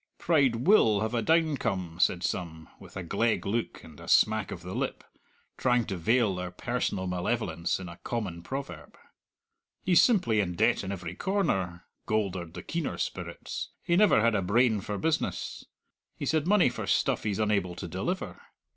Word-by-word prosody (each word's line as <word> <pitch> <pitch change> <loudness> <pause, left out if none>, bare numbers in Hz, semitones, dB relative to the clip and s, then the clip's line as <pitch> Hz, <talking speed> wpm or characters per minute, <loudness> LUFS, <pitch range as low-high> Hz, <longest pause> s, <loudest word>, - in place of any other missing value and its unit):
"Pride 135 -8 +2
will 115 - +5
have 110 +2 -1
a 120 - +1
downcome," 115 - 0
said 90 -1 +2
some, 80 -3 -4
with - - -12
a 95 - -4
gleg 115 +6 0
look 110 +4 -2
and 80 -3 -13
a - - -11
smack 110 -2 +3
of 85 - -7
the 90 +1 -6
lip, - - -3 0.6
trying 125 -2 +2
to 95 - -4
veil 110 +4 +2
their 90 0 -4
personal 100 0 -2
malevolence 90 -2 -1
in 95 - -7
a 85 0 -10
common 100 -8 -4
proverb. 85 - -7 0.9
"He's 180 -3 +5
simply 150 - +3
in 90 -4 -1
debt - - +2
in 95 - -4
every 90 -3 -5
corner," 95 - -1 0.2
goldered 95 -6 -1
the - - -7
keener 170 -2 -3
spirits; - - -5
"he 170 - +1
never 205 - +5
had 115 +1 +3
a 100 - +1
brain 110 +3 +2
for 105 +1 -4
business. 160 +6 -2 0.5
He's - - -2
had 155 0 0
money 205 -1 +5
for - - -6
stuff - - +1
he's 105 -3 -2
unable 100 -5 0
to - - -6
deliver! - - -4
105 Hz, 175 wpm, -28 LUFS, 90-125 Hz, 0.9 s, will